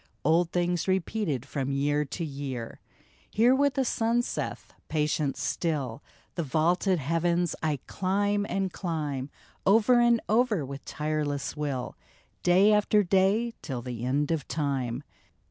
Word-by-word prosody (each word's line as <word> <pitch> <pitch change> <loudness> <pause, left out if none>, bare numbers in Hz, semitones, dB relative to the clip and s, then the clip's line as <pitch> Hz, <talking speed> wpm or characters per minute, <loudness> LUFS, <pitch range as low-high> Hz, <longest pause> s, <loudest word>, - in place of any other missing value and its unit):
Old 165 +2 +3
things 175 0 0
repeated 185 - -1
from 140 -2 -3
year 145 +2 +1
to 165 +5 -4
year! 135 -5 -5 0.5
Hear 235 +4 +4
what 280 0 +2
the 270 - +1
sun 235 +1 +1
saith: - - -5
" - - -44
Patient 150 -2 0
still, 145 -7 -2 0.3
The 170 - -2
vaulted 170 +5 +2
heavens 170 +3 0
I 155 -2 0
climb 205 +2 0
and 190 -1 -1
climb, 150 -6 -3 0.3
Over 225 +5 +5
and 240 -1 +4
over 220 - +2
with 140 +1 -8
tireless 150 -2 -2
will, 140 -4 -3 0.5
Day 190 +4 +5
after 210 0 +3
day 195 +5 +2
till 130 -6 -5
the 120 -2 -5
end 140 +5 0
of 160 -5 -1
time 135 -4 -2
165 Hz, 140 wpm, -28 LUFS, 140-200 Hz, 0.5 s, Over